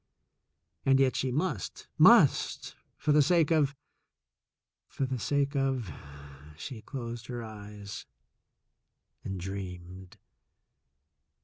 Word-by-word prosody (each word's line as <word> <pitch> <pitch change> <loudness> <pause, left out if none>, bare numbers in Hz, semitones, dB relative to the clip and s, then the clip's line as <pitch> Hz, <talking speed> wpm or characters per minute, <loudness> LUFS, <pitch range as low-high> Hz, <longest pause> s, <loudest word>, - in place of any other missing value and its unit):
And 135 0 +4
yet 130 -3 +3
she 130 - 0
must, 145 - -3
must, - - +5 0.2
for 150 - 0
the 150 0 +6
sake 165 +1 +3
of 145 -3 +3 0.6
— - - -62 0.3
for 135 - -2
the 130 -1 -3
sake 140 +6 0
of 135 - 0 0.3
— 70 +2 -15
she 115 - -7
closed 120 -3 -6
her 120 -2 -5
eyes 105 -2 -9 1.2
and 95 -1 -4
dreamed. 95 +1 -7
120 Hz, 110 wpm, -30 LUFS, 95-135 Hz, 1.2 s, the